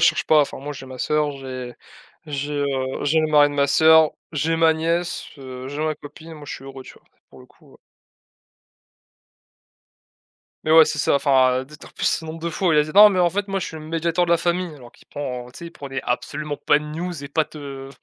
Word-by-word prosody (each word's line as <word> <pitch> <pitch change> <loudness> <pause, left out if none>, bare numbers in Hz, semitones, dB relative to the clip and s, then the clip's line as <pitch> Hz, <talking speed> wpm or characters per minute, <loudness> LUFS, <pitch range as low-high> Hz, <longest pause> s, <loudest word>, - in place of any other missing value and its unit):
cherche - - +1
pas, 155 -1 +5
enfin 145 - -2
moi, 145 +2 -6
j'ai 135 -2 -10
ma 130 -1 -10
soeur, 150 -1 0
j'ai 130 -2 -7 0.5
j'ai, 145 0 -4
heu, 135 -2 -2
j'ai 155 +2 +2
le 155 - 0
mari 145 -1 +5
de 145 - -7
ma 140 0 +2
soeur, 160 +2 +5 0.2
j'ai 160 +2 0
ma 165 0 +4
nièce, 170 +2 -2
heu, 130 -1 -8
j'ai 145 +2 -4
ma 155 - 0
copine, 155 +3 -12
moi, 150 - -11
je - - -5
suis 135 - -11
heureux, 135 -1 -9
tu - - -13
vois? - - -22 0.3
Pour - - -16
le - - -16
coup, - - -23
heu - - -17 2.9
Mais 155 - -1
ouais, 160 0 +8
c'est 155 0 -3
ça, 140 - +2
enfin, 130 -2 +3
heu, - - -10
d'être 150 +2 -14
en - - -12
plus - - -6
ce 160 - 0
nombre 160 +1 -7
de 170 +1 -3
fois 180 +2 -1
où - - +3
il 150 - +4
a 150 - +4
dit: 155 - -8
«Non 210 +1 +10
mais 190 -3 -1
en 175 -1 +3
fait 200 +2 -3
moi 195 - -1
je 185 - -4
suis 160 - -8
le 155 - -9
médiateur 165 +2 0
de - - -3
la 170 - +5
famille». 175 0 -1
Alors 120 -3 -14
qu'il - - -23
prend, 125 -4 -5
heu, - - -14
tu - - -12
sais 170 - -8
il 170 - -11
prenait 135 -4 -6
absolument 145 +4 -3
pas 150 - +2
de 150 - -9
news 160 0 -5
et - - -5
pas 155 +2 +1
te, 155 0 -13
heu, 135 -2 -8
150 Hz, 260 wpm, -22 LUFS, 140-165 Hz, 2.9 s, Non